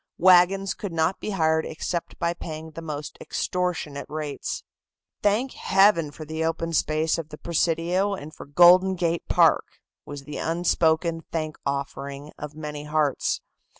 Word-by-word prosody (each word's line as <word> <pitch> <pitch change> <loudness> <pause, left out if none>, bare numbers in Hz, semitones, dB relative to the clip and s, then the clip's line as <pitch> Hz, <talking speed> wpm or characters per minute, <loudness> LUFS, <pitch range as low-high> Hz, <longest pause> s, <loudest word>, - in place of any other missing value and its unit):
Wagons 185 +2 +5
could 200 - -6
not 165 +3 0
be - - -4
hired 160 -5 +2
except 170 +2 -4
by 170 -1 0
paying 160 -1 -7
the 165 - -8
most 150 -2 -6
extortionate 175 -6 -2
rates. 150 -1 -4 0.6
"Thank 215 +6 +2
Heaven 195 -5 +3
for 155 +2 -9
the 160 +1 -3
open 165 +1 -1
space 155 +1 +1
of 160 -2 -6
the 150 - -9
Presidio 170 +4 0
and 155 -3 -9
for - - -11
Golden 180 +5 +6
Gate 170 -1 -1
Park!" - - +3 0.3
was 145 -1 -8
the 150 +1 -7
unspoken 165 0 +1
thank 155 -2 -2
offering 140 +1 -4
of 150 0 -7
many 150 -1 -6
hearts. 150 -2 0
160 Hz, 150 wpm, -25 LUFS, 150-175 Hz, 0.6 s, Golden